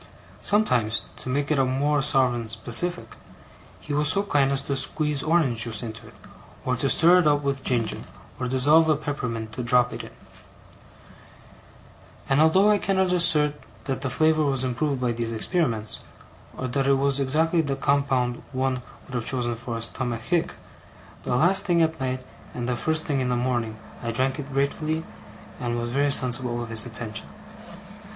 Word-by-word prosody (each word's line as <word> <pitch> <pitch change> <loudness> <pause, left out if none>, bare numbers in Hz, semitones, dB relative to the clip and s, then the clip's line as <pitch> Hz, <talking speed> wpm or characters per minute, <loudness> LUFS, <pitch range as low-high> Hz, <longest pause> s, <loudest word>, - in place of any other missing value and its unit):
Sometimes, 120 - +2
to - - -7
make 140 +3 -1
it 150 - +2
a - - +4
more 140 +3 +1
sovereign 130 -5 +2
specific, 120 +11 -2 0.6
he 145 - -6
was 150 +1 +2
so 200 +5 +2
kind 145 -8 +1
as 140 0 +2
to 140 - -2
squeeze 150 +1 -1
orange 155 -8 +1
juice 115 -2 -3
into 115 -1 -8
it, - - -16 0.5
or 130 - +1
to 135 +3 -1
stir 175 +5 +6
it 170 - +2
up 145 -1 +2
with 140 -1 -2
ginger, 120 -4 0 0.4
or 125 - -2
dissolve 145 +6 +4
a 155 - +4
peppermint 125 -6 -4
drop 125 +1 +3
in - - -5
it; - - -11 2.1
and 135 +2 +3
although 190 +7 +5
I 205 - +3
cannot 190 -2 +1
assert 155 -4 +3 0.3
that 135 -2 -3
the 135 - -1
flavour 155 +4 +2
was 135 -3 +1
improved 130 +2 -1
by 125 -1 0
these 115 0 -3
experiments, 115 - -1 0.6
or 130 - -3
that 135 +2 -1
it 140 - +5
was 140 0 +1
exactly 160 +5 +2
the 140 -3 -2
compound 135 -3 0
one 130 -1 -1 0.2
would 130 - -13
have 120 -2 -3
chosen 125 -3 -1
for 115 0 -6
a 115 - -5
stomachic, 120 +7 -2 0.7
the - - -2
last 175 +9 +4
thing 170 -3 +3
at 160 0 -1
night 130 -1 -3 0.3
and 120 -1 -4
the 125 - 0
first 160 +5 0
thing 145 -3 -1
in 130 -1 -1
the 125 - +1
morning, 120 -3 -2 0.2
I 115 - -4
drank 130 +4 -1
it 145 0 -7
gratefully 155 +4 -1 0.5
and 120 -1 -2
was 120 0 -3
very 140 +3 +1
sensible 125 -3 +3
of 115 - -8
his 115 0 +4
attention. 110 -1 -6
135 Hz, 175 wpm, -24 LUFS, 120-150 Hz, 2.1 s, stir